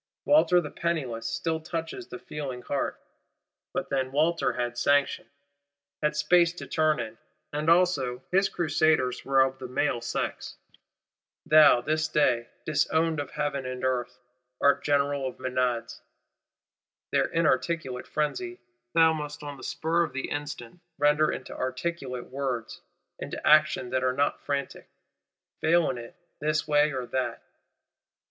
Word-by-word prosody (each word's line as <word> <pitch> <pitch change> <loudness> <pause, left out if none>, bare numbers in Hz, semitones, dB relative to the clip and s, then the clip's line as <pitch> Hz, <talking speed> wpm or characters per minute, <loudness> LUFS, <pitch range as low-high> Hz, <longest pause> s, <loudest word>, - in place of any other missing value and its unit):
Walter 290 - +5
the 150 -4 -5
Penniless 130 -10 -2
still 160 +8 -1
touches 165 - -5
the - - -7
feeling 135 - -6
heart: 140 - -2 0.7
but - - -3
then 130 -1 0
Walter 160 +4 +1
had 120 -1 -2
sanction; 140 +3 +1 0.7
had 150 0 +1
space 170 +3 +4
to 175 - -8
turn 155 -3 +1
in; 110 -1 -6 0.3
and 150 +2 0
also 145 -8 +2
his 195 +2 +3
Crusaders 155 -6 +1
were 135 0 +3
of 130 0 +1
the 130 - -6
male 125 -1 0
sex. 115 - -4 0.9
Thou, 155 -5 +7
this 155 +3 0
day, 125 -6 +1 0.2
disowned 160 +1 +1
of 145 -2 -4
Heaven 145 -3 -2
and 130 0 -5
Earth, 125 -2 -1 0.4
art 140 - +3
General 140 -1 +1
of 130 - -7
Menads. 125 -2 -2 1.1
Their - - +3
inarticulate 155 -4 0
frenzy 355 - -2 0.4
thou 160 -1 +6
must 150 -1 -6
on 145 -1 -6
the - - -12
spur 165 +2 0
of 160 -6 -1
the 135 - -4
instant, 145 0 -5 0.2
render 150 +1 +3
into - - -6
articulate 130 -2 -4
words, 130 -4 -3 0.4
into - - -6
actions 155 -5 +4
that 130 0 0
are 130 0 +2
not 140 +2 0
frantic. 140 -1 -4 0.7
Fail 165 -1 +3
in 125 - -6
it, 115 0 -10 0.2
this 155 +1 0
way 150 0 +4
or 130 -2 -3
that! 130 +1 -3
145 Hz, 140 wpm, -27 LUFS, 130-160 Hz, 1.1 s, Thou